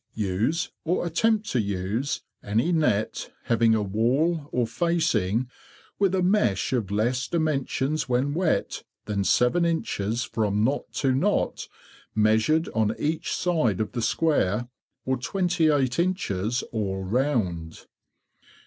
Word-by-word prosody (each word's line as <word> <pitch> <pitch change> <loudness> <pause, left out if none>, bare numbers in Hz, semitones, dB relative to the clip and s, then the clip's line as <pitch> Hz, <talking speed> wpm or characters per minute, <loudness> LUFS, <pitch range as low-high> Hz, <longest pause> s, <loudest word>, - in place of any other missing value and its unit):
3. 110 - -1
Use 110 - -1
or 175 +2 0
attempt 215 +6 +1
to 125 - +2
use 100 +7 -2 0.2
any 115 +11 +1
Net 150 -11 0
having 115 -1 +3
a 105 - 0
wall 135 - 0
or 125 -1 +1
facing, 115 - 0 0.5
with 195 -2 +2
a 185 - +1
mesh 180 - +2
of 115 -7 -1
less 120 +5 0
dimensions 150 -2 -1
when 130 +3 +1
wet 175 0 0 0.2
than 100 -2 -1
seven 125 - +3
inches 120 -9 -1
from 105 -1 0
knot 135 +5 -1
to 135 -2 +1
knot, 185 +11 0 0.5
measured 110 +10 +3
on 110 -1 0
each 155 +2 -2
side 155 - +1
of 110 - -2
the 120 - -3
square, 120 - +1 0.4
or 130 0 0
28 155 -4 +1
inches 120 - 0
all 95 -4 -2
round. 95 - -1
125 Hz, 130 wpm, -25 LUFS, 110-160 Hz, 0.5 s, having